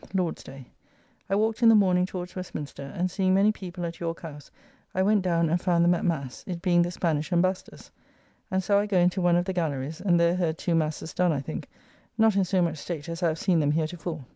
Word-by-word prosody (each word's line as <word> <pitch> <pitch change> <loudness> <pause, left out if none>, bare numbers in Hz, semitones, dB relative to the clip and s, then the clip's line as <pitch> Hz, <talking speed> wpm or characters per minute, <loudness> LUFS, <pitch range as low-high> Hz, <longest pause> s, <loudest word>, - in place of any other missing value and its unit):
(Lord's 180 -3 -1
day) 135 -1 -11 0.6
I 195 - +2
walked 220 +3 0
in 230 - +7
the 225 - +7
morning 185 -3 +3
towards 180 -1 -7
Westminster, 145 -6 -7
and 180 +1 0
seeing 185 -1 +1
many 200 +2 +4
people 180 -4 -6
at 170 0 -6
York 165 -1 -4
House, 150 -3 -9 0.5
I 185 - +2
went 205 +1 +3
down 170 -2 +1
and 170 +2 0
found 170 -2 +2
them 175 - +5
at 175 - -2
mass, 140 -7 -2
it 175 -2 -4
being 175 -1 +3
the 175 - +1
Spanish 160 -3 -1
ambassodors; 185 +2 -1 0.6
and 190 -1 0
so 200 +2 +3
I 205 - -1
go 200 -3 +1
into 180 +1 +2
one 175 -1 +3
of 175 0 +1
the 190 - -2
gallerys, 155 -3 -3
and 175 -3 +3
there 170 +1 +3
heard 165 -3 -1
two 175 - -1
masses 160 0 -1
done, 180 -1 +2
I 145 - -1
think, 135 - -6 0.5
not 220 -2 +4
in 195 -1 +3
so 185 0 +1
much 160 -3 -2
state 165 -1 -6
as 165 +1 -5
I 175 - +3
have 160 -1 -1
seen 175 -1 +2
them 145 -1 +2
heretofore. 160 -1 -3
175 Hz, 240 wpm, -26 LUFS, 165-185 Hz, 0.6 s, in